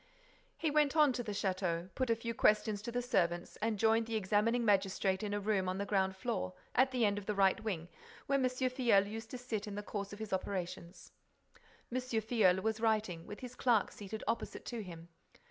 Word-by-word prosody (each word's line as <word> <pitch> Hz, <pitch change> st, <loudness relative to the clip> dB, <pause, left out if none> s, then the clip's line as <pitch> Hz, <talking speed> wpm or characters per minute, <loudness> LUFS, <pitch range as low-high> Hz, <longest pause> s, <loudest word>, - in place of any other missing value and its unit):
He 315 Hz, -, 0 dB
went 300 Hz, -1 st, +3 dB
on 300 Hz, -4 st, +5 dB
to 245 Hz, -, -2 dB
the 220 Hz, -, -4 dB
château, 185 Hz, -3 st, -1 dB
put 260 Hz, -2 st, -1 dB
a 230 Hz, -, +4 dB
few 230 Hz, +1 st, -4 dB
questions 210 Hz, -1 st, +3 dB
to 235 Hz, +2 st, -5 dB
the 245 Hz, +1 st, -1 dB
servants 175 Hz, -8 st, 0 dB
and 220 Hz, 0 st, -1 dB
joined 225 Hz, +2 st, +3 dB
the 230 Hz, -, -2 dB
examining 220 Hz, +4 st, +2 dB
magistrate 195 Hz, -2 st, +2 dB
in 210 Hz, -1 st, -3 dB
a 205 Hz, -, 0 dB
room 200 Hz, -2 st, 0 dB
on 185 Hz, -, -2 dB
the 200 Hz, -, -2 dB
ground 190 Hz, -2 st, +1 dB
floor, 190 Hz, -, -2 dB, 0.2 s
at 260 Hz, +2 st, +4 dB
the 250 Hz, -3 st, +1 dB
end 205 Hz, 0 st, +1 dB
of 200 Hz, -, -13 dB
the 210 Hz, -, 0 dB
right 195 Hz, +2 st, +3 dB
wing, 180 Hz, -7 st, -3 dB, 0.4 s
where 275 Hz, 0 st, +2 dB
M. -, -, +3 dB
Filleul 255 Hz, -5 st, +2 dB
used 225 Hz, +2 st, -7 dB
to 255 Hz, -, -5 dB
sit 230 Hz, -4 st, -4 dB
in 205 Hz, -, -5 dB
the 205 Hz, -, -4 dB
course 200 Hz, -1 st, -4 dB
of 205 Hz, -, -7 dB
his 220 Hz, -2 st, -5 dB
operations. 185 Hz, -2 st, -4 dB, 0.8 s
M. 255 Hz, -, +1 dB
Filleul 220 Hz, -6 st, +2 dB
was 220 Hz, 0 st, 0 dB
writing, 215 Hz, -7 st, 0 dB
with 210 Hz, -, -8 dB
his 250 Hz, -1 st, -7 dB
clerk 240 Hz, -5 st, +2 dB
seated 210 Hz, +1 st, -7 dB
opposite 230 Hz, -, -2 dB
to 235 Hz, -2 st, -4 dB
him. 170 Hz, -3 st, -10 dB
210 Hz, 215 wpm, -34 LUFS, 195-235 Hz, 0.8 s, on